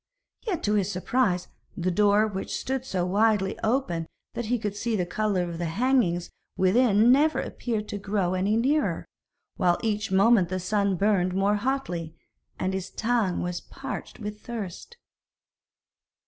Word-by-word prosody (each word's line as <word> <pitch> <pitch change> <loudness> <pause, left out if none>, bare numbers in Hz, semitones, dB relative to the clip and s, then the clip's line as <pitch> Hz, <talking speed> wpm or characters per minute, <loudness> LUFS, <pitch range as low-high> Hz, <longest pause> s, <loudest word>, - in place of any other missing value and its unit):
Yet, 365 -7 -1
to 210 - +1
his 205 -2 +1
surprise, 185 -1 0 0.3
the 180 +1 0
door 205 +3 +4
which 195 -3 -4
stood 265 0 -3
so 185 -8 -1
widely 205 +1 +2
open 220 -9 0 0.3
that 240 - -4
he 245 +2 +1
could 210 -3 -3
see 230 +2 -1
the 180 -4 0
colour 195 0 0
of 170 -1 -6
the 175 - -1
hangings 185 -2 +1 0.3
within 215 +3 +4
never 300 +4 +4
appeared 220 -3 -3
to 205 - -4
grow 195 -3 0
any 195 +4 +1
nearer, 285 +6 +1 0.5
while 180 -4 +3
each 210 -3 -1
moment 195 -1 +5
the 185 0 -2
sun 200 +1 +1
burned 185 -1 +2
more 200 +2 +2
hotly, 205 -10 -2 0.4
and 185 0 -1
his 190 0 -3
tongue 225 -6 0
was 175 0 -3
parched 270 -1 -7
with 210 -1 -6
thirst. 230 - -7
205 Hz, 155 wpm, -26 LUFS, 185-230 Hz, 0.5 s, moment